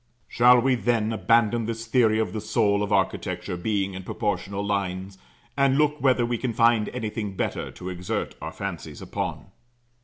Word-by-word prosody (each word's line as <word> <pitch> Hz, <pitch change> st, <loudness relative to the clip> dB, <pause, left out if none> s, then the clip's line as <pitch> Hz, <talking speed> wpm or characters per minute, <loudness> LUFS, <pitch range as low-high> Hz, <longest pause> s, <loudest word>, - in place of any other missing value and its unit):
Shall 125 Hz, +1 st, +6 dB
we, 130 Hz, +2 st, +2 dB
then, 115 Hz, -3 st, +1 dB
abandon 115 Hz, 0 st, +2 dB
this 115 Hz, 0 st, -4 dB
theory 115 Hz, -2 st, +3 dB
of 110 Hz, -1 st, -1 dB
the 110 Hz, -, -3 dB
soul 105 Hz, -1 st, +1 dB
of 105 Hz, 0 st, -2 dB
architecture 95 Hz, -2 st, -1 dB
being 100 Hz, +1 st, -1 dB
in 95 Hz, -, -6 dB
proportional 100 Hz, 0 st, -3 dB
lines, 95 Hz, -1 st, -3 dB, 0.4 s
and 140 Hz, -1 st, +3 dB
look 150 Hz, 0 st, +2 dB
whether 130 Hz, -3 st, +3 dB
we 120 Hz, -1 st, -2 dB
can 125 Hz, -3 st, -2 dB
find 115 Hz, -1 st, +3 dB
anything 110 Hz, -4 st, -4 dB
better -, -, -2 dB
to 90 Hz, -, -8 dB
exert 90 Hz, 0 st, -3 dB
our -, -, -5 dB
fancies -, -, -6 dB
upon? -, -, -5 dB
110 Hz, 165 wpm, -25 LUFS, 100-120 Hz, 0.4 s, Shall